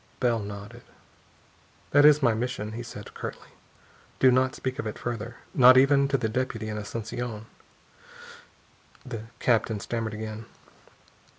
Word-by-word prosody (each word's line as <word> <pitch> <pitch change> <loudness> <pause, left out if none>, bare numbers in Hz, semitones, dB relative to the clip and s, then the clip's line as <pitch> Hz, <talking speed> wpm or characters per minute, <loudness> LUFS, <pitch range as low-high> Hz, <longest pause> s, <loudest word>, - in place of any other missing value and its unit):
Bell 120 -3 +2
nodded. 105 +3 -8 1.1
"That 145 +1 +6
is 150 -1 +6
my 120 -3 +4
mission," 110 -2 -3
he 115 +2 -6
said 110 -3 -9
curtly. - - -7 0.7
"Do 130 - +5
not 130 +1 +2
speak 130 0 -4
of 115 - -2
it 105 - -5
further 115 -1 -5 0.2
not 130 -1 +8
even 140 +1 +5
to 135 0 +1
the 120 - -1
deputy 115 -2 -2
in 105 - -4
Asunción." 110 +1 -5 1.6
The 115 -4 -6
captain 115 -3 +1
stammered 115 0 -3
again. 110 0 -6
115 Hz, 135 wpm, -27 LUFS, 110-130 Hz, 1.6 s, not